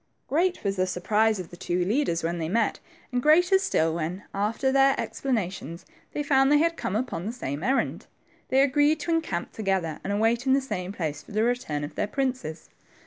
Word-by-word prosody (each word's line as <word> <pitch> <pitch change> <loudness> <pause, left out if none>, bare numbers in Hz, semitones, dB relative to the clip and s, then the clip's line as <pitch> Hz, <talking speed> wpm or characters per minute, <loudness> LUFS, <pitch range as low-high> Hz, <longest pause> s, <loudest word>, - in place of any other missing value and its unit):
Great 355 +5 +1
was 195 -1 -1
the 185 0 +1
surprise 210 +4 +1
of 180 - -7
the - - -9
two 175 +1 -1
leaders 195 - 0
when 170 +1 -1
they 160 -1 -2
met 230 +5 +1 0.3
and 250 -1 0
greater 355 +7 +5
still 165 - +1
when, 170 +4 -3
after 220 +7 0
their 270 0 +4
ex - - -5
planations, 190 - -2 0.3
they 295 - -2
found 270 -1 +4
they 295 - +6
had 335 +2 +2
coihe 205 - -2
upon 220 -6 -3
the - - -1
same 145 - -5
errand. 265 +5 0 0.4
They 265 +1 +4
agreed 290 +3 +3
to 335 - -2
encamp 315 - -1
together 190 -7 -1
and - - -3
await 225 +5 +1
in 265 - +5
the 275 - +4
same 185 -9 -4
place 155 -6 -3
the 215 +2 -2
return 235 -12 -1
of 145 - -6
their - - -1
princes. 255 - -3
220 Hz, 200 wpm, -26 LUFS, 175-270 Hz, 0.4 s, they